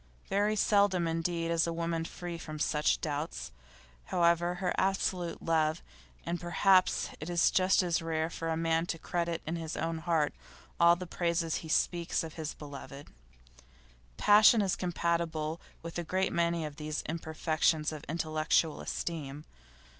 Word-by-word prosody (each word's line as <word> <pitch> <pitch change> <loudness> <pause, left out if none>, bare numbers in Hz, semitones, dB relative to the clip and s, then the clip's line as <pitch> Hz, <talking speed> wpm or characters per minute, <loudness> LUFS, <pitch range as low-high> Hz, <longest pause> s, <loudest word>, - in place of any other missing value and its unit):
Very 205 +2 +2
seldom 200 -4 +3
indeed 165 0 -1
is 165 0 +2
a - - -1
woman 165 0 -2
free 175 0 -6
from 155 -1 -7
such 150 0 +1
doubts, 145 - -4 0.5
however 175 - +1
absolute 185 -3 0
her - - -11
love; 160 0 +1 0.4
and 170 +1 -3
perhaps 185 +2 +3
it 155 - -6
is 175 -1 +3
just 185 0 +3
as 170 -2 0
rare 160 -1 -1
for 165 -1 -4
a 160 - 0
man 165 0 +1
to 165 - -2
credit 170 0 -2
in 165 +2 -2
his 160 -1 -5
heart 165 -2 0 0.5
all 170 0 +7
the 180 +1 -6
praises 170 -2 -1
he 160 - -8
speaks 170 +2 +1
of 160 -1 -7
his 155 -2 -5
beloved. 140 -1 -9 1.1
Passion 210 +1 +6
is 190 - +1
compatible 170 -2 -1 0.2
with 170 +1 -5
a - - -2
great 185 +3 0
many 170 -1 +1
of 150 -1 -7
these 150 0 -4
imperfections 160 -1 0
of 155 -2 -7
intellectual 155 0 +1
esteem. 150 -3 -4
165 Hz, 150 wpm, -31 LUFS, 160-175 Hz, 1.1 s, all